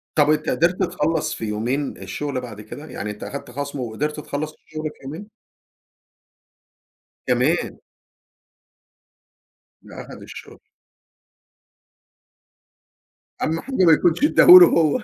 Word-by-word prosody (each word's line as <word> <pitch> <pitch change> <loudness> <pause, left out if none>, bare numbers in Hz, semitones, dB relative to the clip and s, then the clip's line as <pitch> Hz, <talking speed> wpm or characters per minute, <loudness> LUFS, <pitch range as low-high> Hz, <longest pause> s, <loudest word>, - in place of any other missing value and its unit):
طب، 150 -1 +3
أنت 155 0 +1
قدرت 175 +3 +1
تخلص 160 -2 -1
في 110 - -6
يومين 120 +7 -3
الشغلة 130 +8 -5
بعد 115 -4 -9
كده؟ 120 +8 -10
يعني 105 -8 -6
أنت 105 - -10
أخدت 140 -2 -8
خصم 140 +2 -5
وقدرت 135 +6 -4
تخلص 150 +1 -5
الشغل 155 0 -10
في 150 - -19
يومين؟ 160 +10 -8 2.0
كمان؟! - - 0 2.0
ده - - -11
أخد - - -12
الشغل. - - -12 2.8
أهم 160 +1 -1
حاجة 270 +7 -7
ما 165 - +6
يكونش 170 - +1
أدَّاه 300 - +4
له 360 0 +11
هو. 165 - +1
150 Hz, 115 wpm, -21 LUFS, 125-160 Hz, 2.8 s, له